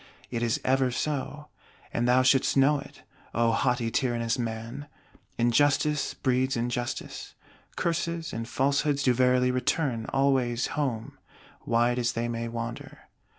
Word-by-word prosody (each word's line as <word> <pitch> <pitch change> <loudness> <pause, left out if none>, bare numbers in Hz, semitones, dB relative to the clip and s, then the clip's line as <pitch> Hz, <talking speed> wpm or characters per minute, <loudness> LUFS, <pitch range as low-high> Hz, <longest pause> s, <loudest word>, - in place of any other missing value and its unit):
It 120 -2 -2
is 115 -1 +1
ever 130 0 +3
so; 150 +3 -3 0.4
and 120 +1 0
thou 125 +1 +4
shouldst 130 +1 +3
know 140 +2 +4
it, - - -13 0.3
O 115 0 +3
haughty 120 0 0
tyrannous 120 -2 0
man; 115 +4 -5 0.5
injustice 145 +5 +2
breeds 130 0 0
injustice; 120 +1 -4 0.4
curses 170 -1 -2
and 115 0 -4
falsehoods 140 +1 +1
do 125 - +4
verily 125 0 +3
return 125 -2 -1
"always 130 -3 +1
home," 125 -7 -3 0.5
wide 120 +1 +2
as 120 -1 0
they 115 +1 -2
may 115 0 -3
wander. 115 0 -7
125 Hz, 130 wpm, -27 LUFS, 115-140 Hz, 0.5 s, thou